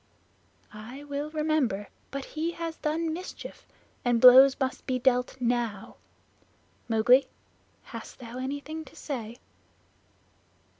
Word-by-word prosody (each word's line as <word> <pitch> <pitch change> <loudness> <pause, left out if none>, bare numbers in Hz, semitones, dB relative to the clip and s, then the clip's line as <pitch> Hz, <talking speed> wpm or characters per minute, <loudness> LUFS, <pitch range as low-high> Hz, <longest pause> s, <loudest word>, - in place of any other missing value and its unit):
"I 235 +7 -9
will 290 +1 -4
remember. 305 -10 0 0.2
But 275 -1 -5
he 325 +2 -3
has 330 -1 -5
done 315 +1 -1
mischief, 360 +3 -8 0.4
and 240 -1 +2
blows 260 +2 +8
must 265 -1 -3
be 255 -1 +1
dealt 250 0 +1
now. 235 -4 -2 0.9
Mowgli, 235 +4 +5 0.6
hast - - -9
thou 245 0 -8
anything 285 +4 -5
to - - -16
say?" 235 -5 -6
265 Hz, 110 wpm, -28 LUFS, 240-305 Hz, 0.9 s, blows